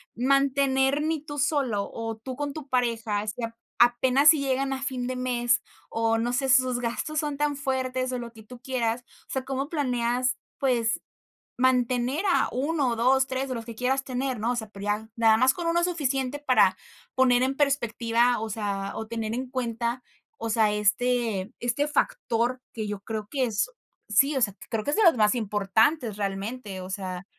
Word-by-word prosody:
mantener 275 +2 +2
ni 315 -1 -1
tú 290 -1 -7
solo, 265 -8 0
o, 225 -1 -4
tú 255 +4 -7
con 290 +1 -3
tu 300 -2 -8
pareja, 230 -4 0
si 235 +3 -4
a 230 0 -4 0.2
apenas 250 +4 +5
si 310 -2 +6
llegan 270 0 0
a 265 - -4
fin 255 -2 -2
de 255 - -3
mes, 250 -1 +1 0.3
o, 225 0 +1
no 240 +2 -1
sé, 270 +1 0
sus 255 -1 +4
gastos 245 +6 -2
son 295 -2 -2
tan 295 0 0
fuertes, 260 -2 -1
o, 250 - -2
lo 235 -1 -7
que 220 - -13
tú 245 +3 -12
quieras. 245 -2 -1 0.2
O - - -13
sea, 265 -1 -2
¿cómo 270 +2 -3
planeas, 250 -4 0 0.2
pues, 235 -4 +1 0.6
mantener 255 - +2
a - - +3
1, 280 +1 0
o, - - -1
2 260 +3 +3
3, 265 0 -2
o, - - 0
lo 230 - -5
que 230 0 -9
quieras 265 +3 0
tener?, 255 -1 -2
¿no? 230 +3 0
O 245 - -1
sea, 220 -2 -4
pero 200 -1 -9
ya 210 +2 -1
nada 225 -1 +5
más 255 +3 +4
con 345 +2 -4
1 340 +1 +2
es 345 - +3
suficiente 275 -5 -1
para 250 -9 +4 0.4
poner 255 -1 +4
en 270 +1 -1
perspectiva, 240 -4 +2
o 220 0 -4
sea, 200 -2 -3
o 220 - -5
tener 225 -1 -3
en 255 +1 -4
cuenta, 240 -1 -2 0.4
o 230 - -4
sea, 220 -1 +3
este 220 0 0
este 245 +5 0
factor 250 -3 0
que 220 -2 -4
yo 205 -1 -5
creo 215 0 -5
que 275 -3 0
es 220 - -1 0.4
sí, 275 +8 +4
o 265 - 0
sea, 205 -4 +1
creo 220 -2 -1
que 290 - 0
es - - +1
de 440 - +4
los 335 -8 +6
más 210 +1 +4
importantes 220 +3 +1
realmente. 200 +1 -4
O 185 - -8
sea 190 -2 -5
250 Hz, 200 wpm, -26 LUFS, 225-265 Hz, 0.6 s, si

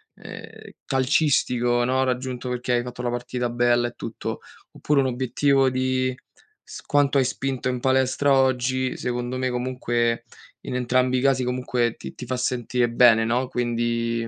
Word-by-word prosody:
uhm, - - -10 0.3
calcistico, 125 -3 +1
no, 130 +2 +1
raggiunto 125 -1 -3
perché 125 0 -3
hai 120 - +1
fatto 125 0 -7
la 120 - -1
partita 120 0 -3
bella 120 0 +2
e - - -17
tutto, - - -5 0.3
oppure 145 -2 +1
un - - 0
obiettivo 130 +2 +2
di 130 0 0 0.5
s - - -10
quanto 145 -1 +2
hai 130 - +4
spinto 130 0 -2
in 125 -1 -2
palestra 130 +2 +2
oggi, 130 -1 +1
secondo 125 +1 -3
me 130 -1 -1
comunque 120 -2 -1 0.4
in - - -6
entrambi 125 +1 +1
i - - -3
casi 135 -2 +2
comunque 125 -1 -1
ti - - -9
ti 125 - -8
fa 130 +1 -2
sentire 125 -1 0
bene, 115 -1 +5
no, 120 +3 0
quindi 115 -1 -1
125 Hz, 160 wpm, -24 LUFS, 120-130 Hz, 0.5 s, bene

